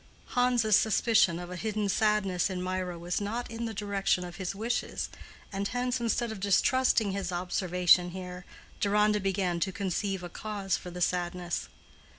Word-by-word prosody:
Hans's 245 -4 +3
suspicion 220 -5 +4
of 175 0 -7
a - - -4
hidden 210 +2 -1
sadness 200 -3 +2
in 185 -1 -3
Mirah 185 -1 -2
was 175 +3 -2
not 230 +4 -3
in 230 +1 -4
the 225 - -4
direction 200 -3 0
of 175 -1 -8
his 190 0 -3
wishes, 230 +4 -2 0.4
and 200 +1 -1
hence, 250 +1 -1
instead 235 0 0
of 220 - -6
distrusting 215 +2 +3
his 190 -2 -3
observation 180 0 +3
here, 180 0 -7 0.4
Deronda 210 +1 +3
began 190 -3 0
to 190 +3 0
conceive 195 -1 -2
a - - -4
cause 200 -1 -2
for 180 - -7
the 180 0 -7
sadness. 175 0 -1
195 Hz, 160 wpm, -29 LUFS, 180-215 Hz, 0.4 s, suspicion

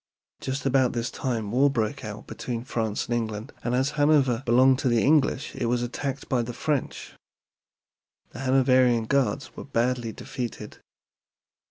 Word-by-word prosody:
Just 135 +1 -4
about 130 -2 +3
this 120 -1 -2
time 115 -5 -3
war 135 +4 +4
broke 125 +1 -2
out 105 -1 -7
between 120 -2 -5
France 110 -4 -2
and 120 - -1
England, 110 +1 -4
and 120 0 0
as 130 +2 +1
Hanover 145 -5 +3
belonged 130 +2 +5
to 140 - 0
the 120 -2 +2
English 145 -2 +2
it - - -2
was 120 0 0
attacked 135 +3 -4
by 125 -2 +1
the 120 +1 -5
French. 150 -4 -2 1.2
The - - -10
Hanoverian 130 -3 +3
Guards 140 +1 0
were - - -7
badly 120 -2 -1
defeated. 120 +1 -7
125 Hz, 155 wpm, -26 LUFS, 115-135 Hz, 1.2 s, belonged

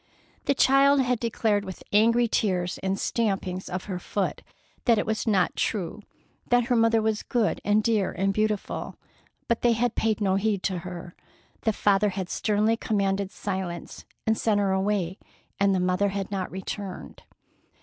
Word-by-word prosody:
The 280 - +2
child 275 +2 +5
had 250 -2 0
declared 220 -3 0
with 190 -2 -8
angry 230 +3 +4
tears 180 -6 0
and 190 0 -1
stampings 195 -5 -1
of 185 +1 -3
her 185 -3 -4
small 195 +1 -1
foot, - - -14 0.4
that 235 -3 +5
it - - 0
was 220 +1 -2
not 205 -3 +2
true, 200 -1 -2 0.5
that 245 0 +4
her 245 +1 +1
mother 225 -1 +3
was 220 -1 0
good 235 -4 0
and 210 +1 +3
dear 215 -4 +1
and 195 +2 0
beautiful; 215 0 -2 0.5
but 235 - 0
they 240 -1 +4
had 240 +1 0
paid 220 -1 0
no 195 -2 +2
heed 200 -1 0
to 185 -2 -1
her. 175 -1 -8 0.5
The 220 - +3
father 205 0 +3
had 190 -2 -4
sternly 215 +1 +1
commanded 200 -3 0
silence 190 -4 -5 0.2
and 220 - +3
sent 215 -2 +1
her 200 -1 +1
away; 190 -2 0 0.4
and 195 -1 +3
the - - +1
mother 185 +2 +1
had 195 0 -4
not 190 -2 -2
returned. 190 +1 -6
205 Hz, 170 wpm, -26 LUFS, 190-220 Hz, 0.5 s, child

